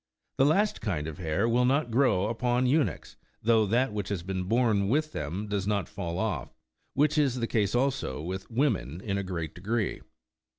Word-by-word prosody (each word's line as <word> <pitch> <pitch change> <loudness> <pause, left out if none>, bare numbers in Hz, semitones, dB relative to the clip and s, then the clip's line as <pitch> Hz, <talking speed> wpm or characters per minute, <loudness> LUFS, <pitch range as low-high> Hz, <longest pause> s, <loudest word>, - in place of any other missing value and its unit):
The 135 - +6
last 200 +7 +2
kind 85 -9 -2
of 80 +2 -6
hair 90 +6 0
will 120 +2 +3
not 135 0 +2
grow 120 -6 +3
upon 120 +3 +1
eunuchs, 145 +3 0 0.3
though 110 -1 +4
that 120 +2 +1
which 105 -3 -3
has 95 -4 -2
been 95 0 -3
born 110 -2 +2
with 155 +5 +1
them 85 - -4
does 100 -2 -2
not 100 -3 0
fall 85 -4 -4
off; 95 -9 -3 0.4
which 150 +2 +3
is 135 -4 +2
the 120 -2 -1
case 105 -2 0
also 125 - 0
with 95 +5 -5
women, 115 - 0
in 100 0 -2
a - - -2
great 85 -4 -4
degree. 105 +4 -2
105 Hz, 185 wpm, -28 LUFS, 95-125 Hz, 0.4 s, The